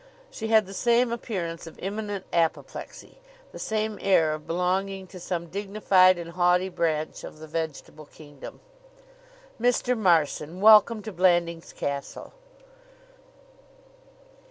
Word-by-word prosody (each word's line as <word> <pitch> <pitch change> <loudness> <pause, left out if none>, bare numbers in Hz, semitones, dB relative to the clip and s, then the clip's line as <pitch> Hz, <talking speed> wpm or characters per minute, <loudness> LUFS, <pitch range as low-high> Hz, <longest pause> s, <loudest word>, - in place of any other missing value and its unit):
She 220 - -5
had 220 -2 +4
the 195 - -10
same 235 +4 +2
appearance 175 -9 -4
of 165 - -12
imminent 205 0 -5
apoplexy, 170 - -3 0.3
the - - -10
same 215 -1 -2
air 165 -5 +3
of 155 0 -8
belonging 190 +3 -1
to 185 0 -12
some 175 -1 -4
dignified 195 -1 +3
and 170 -1 -7
haughty 180 +1 +2
branch 155 -3 -2
of - - -9
the 155 - -10
vegetable 155 -1 -6
kingdom. 145 -3 -12 1.0
"Mr. 245 +1 +2
Marson, 170 -4 +1
welcome 215 +1 +6
to 220 - -6
Blandings 175 -2 +1
Castle!" 140 - -5
185 Hz, 120 wpm, -26 LUFS, 165-210 Hz, 1.0 s, welcome